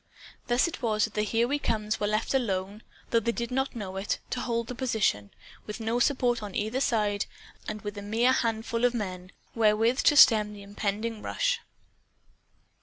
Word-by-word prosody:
Thus 245 Hz, +6 st, +3 dB
it 340 Hz, -, -7 dB
was 215 Hz, -3 st, +1 dB
that 220 Hz, -, -1 dB
the 210 Hz, -, 0 dB
Here 225 Hz, +3 st, +1 dB
We 290 Hz, +3 st, 0 dB
Comes 215 Hz, -4 st, -1 dB
were 205 Hz, -, 0 dB
left 215 Hz, +4 st, 0 dB
alone 205 Hz, -5 st, -1 dB, 0.3 s
(though 230 Hz, -, +4 dB
they 235 Hz, +1 st, 0 dB
did 235 Hz, 0 st, -4 dB
not 265 Hz, +1 st, -1 dB
know 190 Hz, -4 st, -5 dB
it), 195 Hz, +2 st, -1 dB
to 250 Hz, -, -2 dB
hold 235 Hz, -1 st, -1 dB
the 250 Hz, -, -6 dB
position, 220 Hz, -, 0 dB, 0.4 s
with 210 Hz, +2 st, -6 dB
no 225 Hz, +2 st, -1 dB
support 245 Hz, -3 st, +2 dB
on 205 Hz, -2 st, -7 dB
either 220 Hz, +5 st, -1 dB
side, 210 Hz, -5 st, +1 dB, 0.4 s
and 215 Hz, 0 st, -5 dB
with 205 Hz, 0 st, -5 dB
a -, -, -7 dB
mere 225 Hz, +5 st, +2 dB
handful 230 Hz, -1 st, -1 dB
of 245 Hz, 0 st, +3 dB
men 185 Hz, -4 st, -5 dB, 0.2 s
wherewith 225 Hz, +3 st, +3 dB
to 295 Hz, -, +5 dB
stem 210 Hz, -5 st, +7 dB
the 200 Hz, -1 st, -10 dB
impending 210 Hz, +2 st, -3 dB
rush. -, -, 0 dB
225 Hz, 185 wpm, -28 LUFS, 210-240 Hz, 0.4 s, stem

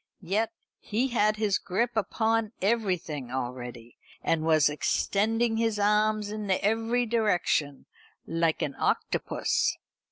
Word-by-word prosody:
Yet 210 Hz, +5 st, 0 dB, 0.3 s
he 240 Hz, +6 st, -1 dB
had 215 Hz, -3 st, +2 dB
his 210 Hz, -2 st, +1 dB
grip 230 Hz, +7 st, -1 dB
upon 220 Hz, +1 st, 0 dB
everything 185 Hz, -, -1 dB
already, 125 Hz, -2 st, -6 dB, 0.3 s
and 165 Hz, -, +1 dB
was 155 Hz, -2 st, +4 dB
extending 225 Hz, +9 st, +1 dB
his 225 Hz, -2 st, +1 dB
arms 210 Hz, 0 st, +2 dB
in 210 Hz, -1 st, -5 dB
every 225 Hz, +5 st, +1 dB
direction, 180 Hz, -, 0 dB, 0.4 s
like 165 Hz, -1 st, 0 dB
an 140 Hz, -, -2 dB
octopus. -, -, 0 dB
210 Hz, 115 wpm, -28 LUFS, 160-225 Hz, 0.4 s, was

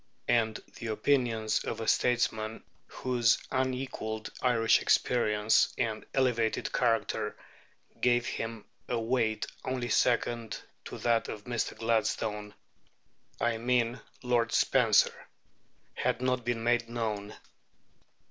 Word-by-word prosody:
And 110 Hz, -2 st, +3 dB, 0.2 s
the 120 Hz, -, -5 dB
opinions 110 Hz, -1 st, +1 dB
of 115 Hz, -, -4 dB
a 115 Hz, -, -4 dB
statesman 115 Hz, -2 st, +1 dB, 0.2 s
whose 125 Hz, -2 st, +2 dB
unequalled 130 Hz, -4 st, -2 dB
Irish 115 Hz, -3 st, +3 dB
experience 105 Hz, -3 st, +3 dB
and 110 Hz, -2 st, -1 dB
elevated 120 Hz, -4 st, +1 dB
character 115 Hz, -3 st, 0 dB, 0.6 s
gave 120 Hz, -1 st, +3 dB
him 115 Hz, -2 st, -4 dB, 0.2 s
a 120 Hz, -, 0 dB
weight 115 Hz, -2 st, 0 dB, 0.2 s
only 125 Hz, -2 st, -2 dB
second 120 Hz, -2 st, +1 dB, 0.3 s
to -, -, -7 dB
that 115 Hz, -1 st, +1 dB
of 105 Hz, -, -6 dB
Mr. 120 Hz, -1 st, -2 dB
Gladstone 110 Hz, -2 st, -1 dB, 0.8 s
I 115 Hz, -1 st, 0 dB
mean 120 Hz, 0 st, +1 dB, 0.2 s
Lord 120 Hz, -2 st, +1 dB
Spencer -, -, +4 dB, 0.8 s
had -, -, -1 dB
not 125 Hz, -1 st, 0 dB
been 115 Hz, -1 st, -2 dB
made 120 Hz, 0 st, +1 dB
known. 110 Hz, -3 st, -3 dB
115 Hz, 110 wpm, -30 LUFS, 110-125 Hz, 0.8 s, Spencer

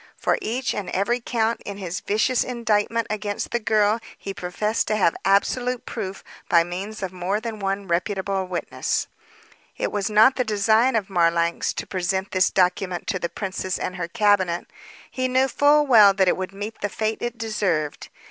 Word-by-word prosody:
For -, -, +1 dB
each 245 Hz, +3 st, -2 dB
and 205 Hz, -, -4 dB
every 200 Hz, +6 st, 0 dB
count 230 Hz, -1 st, -1 dB
in 200 Hz, -1 st, -6 dB
his 185 Hz, -3 st, -4 dB
vicious 220 Hz, +4 st, +1 dB
indictment 230 Hz, -2 st, 0 dB
against 205 Hz, -1 st, -3 dB
the 240 Hz, -, +1 dB
girl 215 Hz, 0 st, +2 dB, 0.2 s
he 195 Hz, -, -6 dB
professed 210 Hz, +5 st, -2 dB
to 215 Hz, -, +1 dB
have 185 Hz, -5 st, +3 dB
absolute 245 Hz, +5 st, +1 dB
proof 195 Hz, -4 st, -5 dB, 0.3 s
by 170 Hz, -1 st, +5 dB
means 195 Hz, +5 st, -6 dB
of 185 Hz, -1 st, -4 dB
more 185 Hz, +3 st, -1 dB
than 220 Hz, -1 st, -6 dB
one 195 Hz, 0 st, -2 dB
reputable 190 Hz, +2 st, -1 dB
witness. 180 Hz, -1 st, -2 dB, 0.7 s
It -, -, -2 dB
was 205 Hz, 0 st, -1 dB
not 220 Hz, +5 st, +5 dB
the 255 Hz, -, +2 dB
design 220 Hz, +3 st, +2 dB
of 210 Hz, -4 st, 0 dB
Marlanx 170 Hz, -2 st, +1 dB
to -, -, -5 dB
present 190 Hz, +1 st, -2 dB
this 185 Hz, 0 st, +3 dB
document 180 Hz, -1 st, 0 dB
to 185 Hz, -, -1 dB
the 170 Hz, -, -2 dB
princess 185 Hz, -1 st, -3 dB
and 180 Hz, -, -4 dB
her 175 Hz, -2 st, -3 dB
cabinet. 190 Hz, -3 st, +2 dB, 0.5 s
He 255 Hz, 0 st, -1 dB
knew 260 Hz, +1 st, +2 dB
full 295 Hz, +2 st, +4 dB
well 215 Hz, -7 st, +7 dB
that 190 Hz, -2 st, +3 dB
it -, -, +4 dB
would 185 Hz, 0 st, -4 dB
meet 205 Hz, +3 st, -7 dB
the 205 Hz, -, -1 dB
fate 220 Hz, +2 st, -2 dB
it 240 Hz, 0 st, -3 dB
deserved. 200 Hz, -9 st, -2 dB
205 Hz, 180 wpm, -23 LUFS, 185-225 Hz, 0.7 s, well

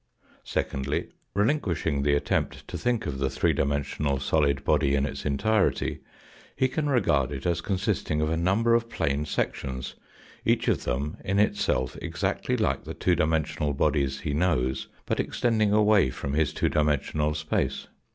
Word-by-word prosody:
Secondly, 70 Hz, 0 st, -2 dB, 0.3 s
relinquishing 95 Hz, -, +1 dB
the 70 Hz, +1 st, +3 dB
attempt 70 Hz, -, -1 dB
to -, -, -7 dB
think 120 Hz, -2 st, 0 dB
of 70 Hz, -2 st, -3 dB
the 70 Hz, -1 st, +1 dB
three 65 Hz, -1 st, +1 dB
dimensional 70 Hz, 0 st, -1 dB
solid 70 Hz, -1 st, +1 dB
body 75 Hz, -2 st, +2 dB
in 70 Hz, 0 st, +1 dB
its 75 Hz, -, -4 dB
entirety 95 Hz, +9 st, +1 dB, 0.6 s
he 130 Hz, -, +2 dB
can 145 Hz, +3 st, -2 dB
regard 75 Hz, -, +2 dB
it 70 Hz, -2 st, -6 dB
as 85 Hz, -1 st, +1 dB
consisting 90 Hz, -5 st, -1 dB
of 75 Hz, -, +1 dB
a -, -, +1 dB
number 100 Hz, +8 st, +2 dB
of 115 Hz, 0 st, +2 dB
plane 70 Hz, -7 st, -1 dB
sections, 65 Hz, -3 st, -3 dB, 0.5 s
each -, -, +1 dB
of -, -, +1 dB
them 70 Hz, +5 st, -2 dB
in 100 Hz, +1 st, 0 dB
itself 65 Hz, -10 st, +1 dB
exactly -, -, -1 dB
like -, -, 0 dB
the 80 Hz, +3 st, -7 dB
two 90 Hz, +2 st, +2 dB
dimensional 80 Hz, -2 st, 0 dB
bodies 70 Hz, -1 st, +1 dB
he 75 Hz, -, -2 dB
knows, 70 Hz, -6 st, 0 dB, 0.2 s
but -, -, -1 dB
extending 110 Hz, -3 st, +1 dB
away 105 Hz, -7 st, +4 dB
from 70 Hz, +2 st, -4 dB
his 75 Hz, 0 st, +2 dB
two -, -, 0 dB
dimensional 75 Hz, 0 st, +1 dB
space. 75 Hz, 0 st, -1 dB
75 Hz, 160 wpm, -27 LUFS, 70-95 Hz, 0.6 s, away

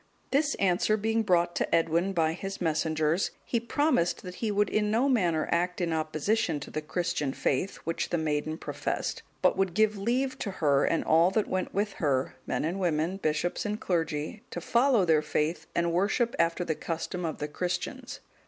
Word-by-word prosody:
This 290 Hz, +2 st, +2 dB
answer 195 Hz, +3 st, +2 dB
being 225 Hz, +2 st, +1 dB
brought 175 Hz, -4 st, +2 dB
to -, -, +1 dB
Edwin 165 Hz, +3 st, +2 dB
by 160 Hz, -3 st, +1 dB
his 195 Hz, +3 st, -6 dB
messengers, 160 Hz, +1 st, +1 dB, 0.2 s
he 235 Hz, -, 0 dB
promised 235 Hz, -, +1 dB
that 180 Hz, -, -7 dB
he 225 Hz, -, 0 dB
would 205 Hz, 0 st, +2 dB
in 210 Hz, -1 st, +1 dB
no 230 Hz, +6 st, +2 dB
manner 175 Hz, -, +2 dB
act 180 Hz, +2 st, 0 dB
in 170 Hz, -2 st, 0 dB
opposition 160 Hz, +3 st, 0 dB
to -, -, -8 dB
the 155 Hz, -, -3 dB
Christian 150 Hz, -3 st, -2 dB
faith, 145 Hz, +8 st, -1 dB
which 165 Hz, -, -2 dB
the 175 Hz, -, 0 dB
maiden 155 Hz, 0 st, -1 dB
professed; -, -, -3 dB, 0.2 s
but -, -, +4 dB
would 190 Hz, -3 st, 0 dB
give 215 Hz, -1 st, +2 dB
leave 260 Hz, +5 st, 0 dB
to 205 Hz, -, -3 dB
her, 145 Hz, -5 st, +2 dB
and 165 Hz, -, +1 dB
all 165 Hz, +3 st, +5 dB
that 210 Hz, +2 st, 0 dB
went 185 Hz, 0 st, -2 dB
with 205 Hz, +1 st, -1 dB
her, 135 Hz, -4 st, +1 dB
men -, -, -1 dB
and 175 Hz, +5 st, -2 dB
women, 170 Hz, 0 st, 0 dB
bishops 160 Hz, 0 st, -1 dB
and 210 Hz, +1 st, -2 dB
clergy, 160 Hz, +1 st, -2 dB
to -, -, -5 dB
follow 240 Hz, -4 st, +3 dB
their 160 Hz, -3 st, +4 dB
faith 150 Hz, +2 st, -1 dB
and 170 Hz, 0 st, +1 dB
worship 210 Hz, +6 st, +1 dB
after 170 Hz, +1 st, +1 dB
the 160 Hz, -, 0 dB
custom 165 Hz, +3 st, -4 dB
of 160 Hz, -2 st, -2 dB
the 150 Hz, -, -3 dB
Christians. 180 Hz, -, -4 dB
175 Hz, 190 wpm, -28 LUFS, 160-210 Hz, 0.2 s, all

